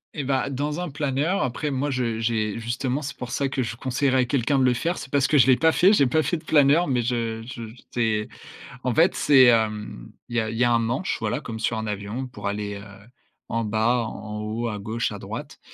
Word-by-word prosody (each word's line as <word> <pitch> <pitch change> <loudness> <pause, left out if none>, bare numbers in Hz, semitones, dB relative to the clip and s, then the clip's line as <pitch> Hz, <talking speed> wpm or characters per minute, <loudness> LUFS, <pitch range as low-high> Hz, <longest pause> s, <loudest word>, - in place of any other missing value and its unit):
Et 145 - -3
bah 135 0 0
dans 145 +4 -2
un 180 -2 -3
planeur, 145 +6 0
après 140 +4 -2
moi, 140 +1 -1
je 120 -3 -1
j'ai 110 -1 -1
justement, 125 +4 -2
c'est 140 - -5
pour 125 - -7
ça 140 +2 0
que 135 -1 -2
je 115 -1 -3
conseillerais 130 +1 +1
à - - +1
quelqu'un 135 +2 +1
de 130 - +3
le 125 -1 +4
faire, 170 +9 -1
c'est 135 - -8
parce 140 -2 +3
que 150 - +3
je 130 - +7
l'ai 130 -1 +6
pas 160 +3 +3
fait. 185 +8 +5
J'ai 140 -10 +4
pas 155 +5 +2
fait 175 - 0
de - - -13
planeur, 150 +3 +4
mais 125 -3 +1
je 115 -2 -2
je 115 -3 -8 0.2
j'ai 110 -3 0 0.6
en 125 - 0
fait, 165 +3 +4
c'est, 135 -3 +6
hem, 110 - +1 0.2
il 120 - -5
y - - +4
a 110 -1 -2
il 115 - -5
y 120 - +4
a 120 - +3
un 115 - +4
manche, 120 +10 -1
voilà, 150 - -1
comme 115 -4 -6
sur 110 0 -1
un 110 - -3
avion 105 +5 -4
pour 105 -5 -6
aller, 105 0 -3
heu, 100 +1 -8 0.6
en 115 0 -1
bas, 110 +3 +1
en 105 0 -6
haut, 115 +2 -3
à 105 -2 -4
gauche, 110 +3 -2
à - - -7
droite - - -7
125 Hz, 250 wpm, -24 LUFS, 110-140 Hz, 0.6 s, je